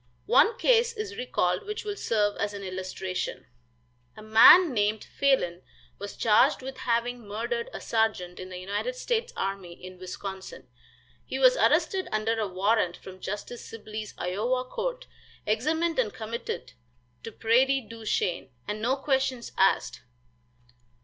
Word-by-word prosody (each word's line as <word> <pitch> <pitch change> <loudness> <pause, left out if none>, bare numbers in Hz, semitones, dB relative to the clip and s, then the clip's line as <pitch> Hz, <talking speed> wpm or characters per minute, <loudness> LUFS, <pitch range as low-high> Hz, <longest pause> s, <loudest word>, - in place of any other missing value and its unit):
One 460 +1 +4
case 475 -1 +3
is 430 -2 -5
recalled 180 - -1
which 425 0 -5
will 410 -1 -3
serve 210 - 0
as 205 0 -2
an 200 - -7
illustration. 185 0 -4 0.7
A 215 - -10
man 235 +10 +8
named 210 -1 0
Phalen 185 -11 +1 0.4
was 205 0 -7
charged 220 +3 +4
with 265 0 -7
having 235 -1 0
murdered 465 - -3
a - - -6
sergeant 215 -6 -1
in 185 - -7
the 185 - -7
United 200 - -3
States 485 -1 -1
army 195 -3 -3
in 185 +1 -12
Wisconsin. 190 +1 -7 0.6
He - - -5
was - - +6
arrested 380 -5 +2
under 220 +1 0
a 215 - 0
warrant 190 0 +1
from 185 0 -12
Justice 210 +5 -6
Sibley's 215 -1 -8
Iowa 230 +8 -1
court, - - -4 0.4
examined 315 +9 0
and 225 -5 +1
committed 220 - -6 0.5
to 225 - -7
Prairie 260 +5 +3
du 230 -1 -10
Chien, 180 -8 -1 0.2
and 210 +1 -3
no 250 +4 +2
questions 265 -3 -1
asked. 160 -9 +2
220 Hz, 145 wpm, -27 LUFS, 195-270 Hz, 0.7 s, man